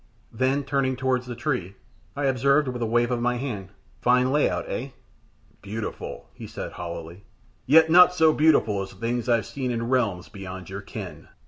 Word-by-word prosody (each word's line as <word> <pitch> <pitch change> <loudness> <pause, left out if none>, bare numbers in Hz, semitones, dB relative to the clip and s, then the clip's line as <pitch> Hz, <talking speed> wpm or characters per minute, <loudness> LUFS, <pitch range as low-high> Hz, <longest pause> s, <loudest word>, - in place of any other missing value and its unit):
Then 130 +2 0
turning 135 -1 0
towards 125 -1 -1
the 120 - -5
tree, 120 - -2 0.4
I 145 0 -1
observed, 140 +2 +3
with 125 -1 -4
a 115 - 0
wave 120 +2 +2
of 120 -1 -1
the 125 0 +1
hand, 110 -8 -5 0.3
"Fine 125 +1 +3
lay 150 +1 +3
out, - - -3
eh?" 130 +4 -4 0.7
"Beautiful," 105 +2 -6
he - - -9
said, - - -6
hollowly. 85 +1 -7 0.4
"Yet 160 +3 +6
not 180 +1 +8
so 160 -3 +4
beautiful 145 -11 +3
as 95 - -7
things 120 +4 -3
I've 115 -2 +2
seen 130 -2 -4
in 115 -1 -2
realms 105 -9 0
beyond 95 -3 -9
your 100 +1 -5
ken." 100 - -8
125 Hz, 180 wpm, -25 LUFS, 100-135 Hz, 0.7 s, not